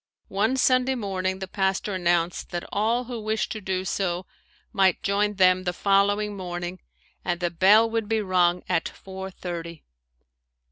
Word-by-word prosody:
One 215 +7 +1
Sunday 255 0 +3
morning 190 -4 -2
the 190 0 -6
pastor 195 +1 -1
announced 175 -1 0
that 175 0 -5
all 225 +4 +1
who 240 -2 -6
wished 215 0 -1
to 215 - -5
do 185 -1 -2
so 180 -1 -1 0.5
might 190 -3 +3
join 205 0 +1
them 185 -1 +4
the 180 -1 -1
following 205 +2 +2
morning 175 -1 -5 0.4
and 175 -1 -1
the 175 -1 -1
bell 200 +6 +5
would 225 -2 -2
be 225 -1 +2
rung 180 -3 +2
at 165 - 0
four 190 0 -8
thirty. 170 -3 -7
190 Hz, 155 wpm, -25 LUFS, 180-210 Hz, 0.5 s, bell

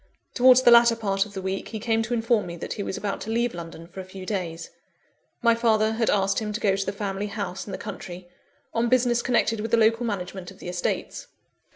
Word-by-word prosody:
Towards 255 0 +6
the 240 - +7
latter 235 0 +7
part 200 -3 0
of 205 - -15
the 190 - -5
week, 190 +1 -3
he 220 - -6
came 225 +1 +1
to 230 +2 -3
inform 225 -3 +1
me 170 - -6
that - - -5
he - - -5
was 195 - -4
about 200 -1 -3
to - - -6
leave 235 +1 0
London 165 -1 -8
for 175 +3 -11
a - - -4
few 185 0 -10
days. 170 -5 -4 0.7
My 235 -1 +6
father 220 -2 +2
had 225 0 0
asked 195 -1 +2
him 215 -1 -4
to 210 - -3
go 195 -3 +2
to 195 0 -2
the - - 0
family 200 0 -3
house, 200 -2 -5
in - - -6
the - - -4
country, 185 -4 -8 0.5
on 230 +1 +1
business 245 -1 +3
connected 230 -3 +1
with 225 +2 -3
the 230 - +3
local 225 +1 +3
management 190 -4 -4
of 190 - -13
the - - -7
estates. 180 0 -3
210 Hz, 240 wpm, -25 LUFS, 190-230 Hz, 0.7 s, the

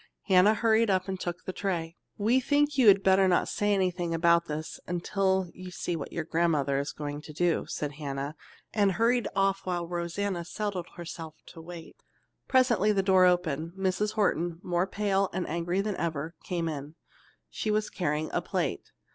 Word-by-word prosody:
Hannah 195 +2 +5
hurried 225 0 +3
up 185 -1 +1
and 190 -1 -3
took 175 -1 -5
the 185 - -4
tray. 170 -5 -2 0.2
"We 225 +5 +3
think 290 +3 +2
you 260 -4 +4
had 195 -1 +7
better 190 0 +5
not 180 - +2
say 205 0 0
anything 180 -3 0
about 170 0 +3
this 155 +1 -5
until 190 +1 0
you 185 0 -9
see 175 -1 -3
what 155 - -6
your 165 - -3
grandmother 155 -4 +1
is 140 - -3
going 145 0 -5
to 155 - -10
do," 170 +2 0
said 145 -1 -3
Hannah 140 0 -5 0.4
and 200 -3 +3
hurried 235 +2 +2
off 195 0 +1
while 175 -2 -1
Rosanna 175 +2 -2
settled 190 -1 -4
herself 165 -2 -7
to 165 - -12
wait. 170 0 -10 0.5
Presently 240 -6 +3
the 195 -2 +1
door 190 -1 +5
opened. 170 -3 +1
Mrs. 195 +2 -1
Horton, 175 -5 0
more 175 +1 0
pale 195 -1 0
and 185 0 -2
angry 170 +3 -1
than 205 -1 -2
ever, 160 -1 -3
came 170 -2 -2
in. 150 0 -5 0.6
She 215 - -3
was 215 0 0
carrying 155 -3 -1
a - - +1
plate. - - -2
180 Hz, 180 wpm, -28 LUFS, 165-200 Hz, 0.6 s, had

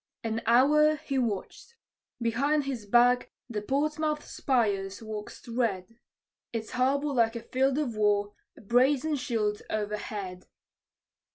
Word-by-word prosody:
An 225 0 -2
hour 300 +6 +5
he 285 -3 -2
watched: 235 - -4 0.4
behind 275 +6 +1
his 255 -6 -5
back 245 +3 +4 0.2
the 220 -4 -4
Portsmouth 300 +5 -1
spires 200 -7 0
waxed 215 0 -8
red; 230 -3 -2 0.5
Its 225 -2 -4
harbor 270 +4 +1
like 230 -2 +2
a 230 - -5
field 265 +1 +1
of 270 -7 -1
war, 205 -1 +1 0.2
a - - -13
brazen 260 +7 +2
shield 220 -6 -1
o'erhead. 205 -3 -4
235 Hz, 120 wpm, -28 LUFS, 210-275 Hz, 0.5 s, hour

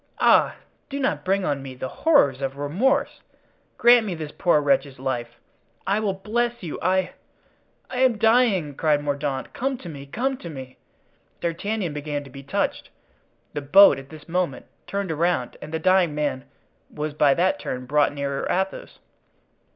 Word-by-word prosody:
Ah! - - +4 0.3
do 280 0 -4
not 275 - -1
bring 195 0 +1
on 140 -2 -1
me 135 -1 -8
the 130 - -5
horrors 145 - +3
of 135 0 -3
remorse! 185 - 0 0.6
Grant 240 0 +6
me 195 -5 -3
this 155 -2 -6
poor 175 -4 +3
wretch's 140 -1 +1
life. 120 -2 -4 0.5
I 200 +2 +1
will 205 -3 -1
bless 235 +4 -2
you—I——" 180 +3 0 0.8
"I 250 - -5
am 255 -4 +3
dying!" 220 - +3
cried 150 0 +1
Mordaunt, 140 -2 -3
"come 270 +1 -2
to 185 - -11
me! 140 -4 -8
come 260 - -2
to 175 - -9
me!" 130 -4 -9 0.6
D'Artagnan 175 +1 -2
began 145 0 -4
to 135 - -14
be 135 - -9
touched. 140 +1 -2 0.6
The 145 - -3
boat 190 +5 +7
at 135 0 -13
this 155 -1 -13
moment 170 -7 -2 0.2
turned 200 -3 -2
around, 160 -5 0
and 155 - -8
the 160 - -1
dying 180 -2 +3
man 145 -3 -2 0.4
was 150 0 -4
by 145 -2 +4
that 185 +2 +1
turn 125 0 -5
brought 145 +3 +2
nearer 140 -1 -3
Athos. 190 +1 -2
155 Hz, 165 wpm, -24 LUFS, 140-200 Hz, 0.8 s, boat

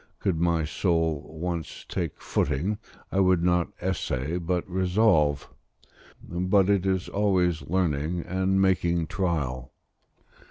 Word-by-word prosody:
Could 90 -5 -1
my 85 -2 +2
soul 80 -2 0
once 85 -1 -4
take 85 -5 -3
footing, 100 +10 -1 0.3
I 100 - +1
would 90 -3 +3
not 90 -1 +2
essay 85 -3 -2
but 90 +1 -1
resolve: 90 -6 +2 0.8
but 90 +3 +2
it 95 -1 +1
is 95 -1 0
always 90 -5 +1
learning 85 -1 -1
and 95 +2 0
making 85 -3 +2
trial. 75 -8 -2
90 Hz, 115 wpm, -26 LUFS, 80-95 Hz, 0.8 s, would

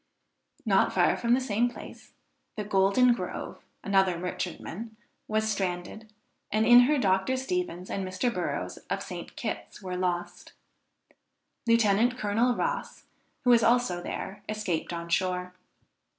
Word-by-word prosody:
Not - - +3
far - - +3
from 235 0 +2
the - - +1
same 240 -1 +1
place, 240 - -12 0.4
the 210 - -2
Golden 205 +5 +4
Grove, - - -6 0.2
another 190 -3 +2
merchantman, 185 +4 -5 0.3
was 220 0 0
stranded, 195 +2 -3 0.4
and 215 +1 +2
in 245 0 +9
her 300 - +3
Dr. 195 +2 +1
Stevens 265 - -3
and 195 - -3
Mr. 185 +6 -1
Burrows - - -3
of - - -2
St. - - -8
Kitts, - - -5
were 185 -2 -5
lost. 180 -1 -3 1.1
Lieutenant 230 +1 +3
Colonel 235 +3 +1
Ross, - - -3 0.4
who 245 - +4
was 235 -1 +6
also 230 -7 +2
there 195 +3 -6
escaped 205 -7 -2
on 170 0 -5
shore. 180 +1 -1
210 Hz, 135 wpm, -28 LUFS, 185-240 Hz, 1.1 s, in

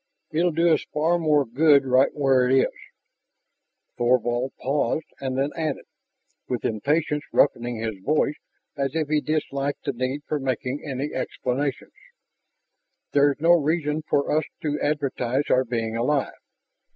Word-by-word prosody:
"It'll 170 +3 +2
do 165 +1 +3
us - - +1
far 165 +3 +2
more 150 -3 +3
good 140 +3 +4
right 130 +1 +4
where 135 -3 +2
it 135 +1 +5
is...." - - +1 1.3
Thorvald 120 +1 +1
paused 145 +3 0
and 130 -1 -3
then 140 +2 0
added, 155 -3 -3 0.6
with 125 - -2
impatience 150 +7 0
roughening 120 -3 +2
his 110 -3 -4
voice 150 +2 +2 0.4
as 140 0 -2
if 155 -2 -1
he 155 -1 +2
disliked 145 -2 -2
the - - -1
need 130 +4 -3
for 150 - -1
making 130 +1 -2
any 140 +1 -4
explanations, 130 +1 -3 1.2
"There 145 0 +4
is - - -23
no 165 +3 +4
reason 155 -2 +2
for 140 +1 +1
us 155 - +1 0.2
to 150 -1 -1
advertise 140 -2 -1
our 130 - +4
being 115 -2 -3
alive. 135 +4 0
140 Hz, 145 wpm, -24 LUFS, 130-150 Hz, 1.3 s, it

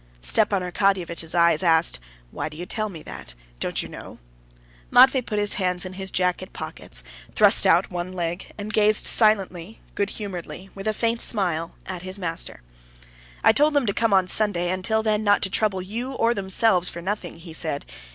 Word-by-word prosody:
Stepan 205 - +2
Arkadyevitch's 180 -3 -1
eyes 170 -1 +3
asked: 165 - +3 0.3
"Why - - -4
do 150 - -13
you 175 - -6
tell 215 +2 -2
me 165 -5 -10
that? - - -10 0.2
don't - - -2
you - - -8
know?" - - -11 0.7
Matvey 260 0 +6
put 220 -3 -5
his 205 0 +1
hands 180 0 -1
in 185 - -7
his 190 0 -5
jacket 180 0 -1
pockets, - - -6 0.3
thrust - - +5
out - - +3
one 175 0 -4
leg, 175 0 -4
and 210 +1 -6
gazed 215 0 +4
silently, 205 -3 +2
good 200 0 -1
humoredly, 190 -2 -7
with 195 +2 -7
a 215 - +1
faint 230 0 0
smile, 170 -6 +1
at 185 -2 -6
his 185 +2 -4
master. 165 - -4 0.8
"I - - +7
told 295 +5 +3
them 285 -3 +2
to 200 - 0
come 230 +1 0
on 190 -2 +3
Sunday, 185 -4 +1
and 185 0 -3
till 220 +2 +1
then 215 -1 0
not 205 -1 +3
to 190 - 0
trouble 195 -3 0
you 235 +7 -5
or 235 -2 +1
themselves 190 -2 +2
for 170 - -8
nothing," 190 -2 -4
he 165 -1 -11
said. 155 -3 0
190 Hz, 190 wpm, -23 LUFS, 175-215 Hz, 0.8 s, I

